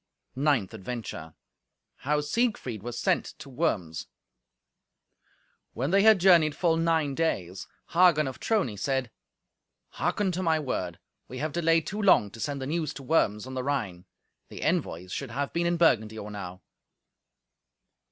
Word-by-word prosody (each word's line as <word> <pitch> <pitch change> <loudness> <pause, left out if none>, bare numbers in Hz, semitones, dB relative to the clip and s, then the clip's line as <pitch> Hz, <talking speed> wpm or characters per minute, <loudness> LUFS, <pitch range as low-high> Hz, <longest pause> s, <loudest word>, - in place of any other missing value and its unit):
Ninth 135 -8 +1
Adventure 105 -7 -6 0.6
How 150 +2 0
Siegfried 150 - -1
Was 120 +2 -6
Sent - - +1
to 140 - -11
Worms 85 - -2 1.7
When 135 +7 -2
they 195 +1 +5
had 220 0 +7
journeyed 170 -5 +5
full 170 -3 +2
nine 165 -3 +1
days, 95 - -2 0.2
Hagen 170 -4 +4
of 130 - -6
Trony 185 - 0
said, 130 +1 -1 0.9
"Hearken 205 -3 0
to 180 +1 -3
my 165 -3 +2
word. 90 - -3 0.3
We 130 - -8
have 155 +4 -2
delayed 165 -1 +2
too 210 +2 -4
long 145 - +4
to 115 - -12
send 140 +5 -3
the 130 - -4
news 155 0 -2
to 140 - -8
Worms 115 -8 +1
on 130 - -8
the 130 - -2
Rhine. 110 -11 -3 0.4
The - - -8
envoys 90 +2 -1
should 140 - -4
have 140 +4 -3
been 170 0 +1
in 175 0 +1
Burgundy 110 -10 +2
or 105 -1 -7
now." 90 -3 -8
140 Hz, 150 wpm, -27 LUFS, 110-165 Hz, 1.7 s, had